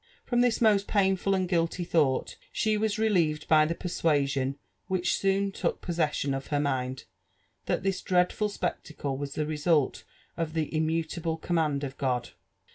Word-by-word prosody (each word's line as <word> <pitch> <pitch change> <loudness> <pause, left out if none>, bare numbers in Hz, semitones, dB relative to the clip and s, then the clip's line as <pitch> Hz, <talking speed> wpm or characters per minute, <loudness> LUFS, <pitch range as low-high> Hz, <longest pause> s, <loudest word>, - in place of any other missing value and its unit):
From 240 -1 +2
this 245 -2 +2
most 210 -3 +4
painful 195 -1 +2
and 185 -1 0
guilty 170 0 0
thought 155 -7 +1 0.2
she 215 -1 +1
was 215 0 0
relieved 170 -9 +1
by 155 -1 +5
tbe 170 - -3
persuasion 140 -6 0 0.3
which 185 -1 +1
soon 195 0 +1
took - - -2
possession 155 -5 -1
of 135 0 -4
her 145 - 0
mind, 130 -2 -1 0.6
that - - 0
this 195 -1 0
dreadful 180 +3 +1
spectacle 150 -8 -3
was 140 +1 -5
the 155 - 0
result 155 -1 +1 0.3
of 165 -2 -2
the 160 -2 -1
immu 160 +1 0
table 165 0 -3
command 155 -4 0
of 135 -1 -6
God. 125 -3 -1
165 Hz, 160 wpm, -28 LUFS, 145-190 Hz, 0.6 s, by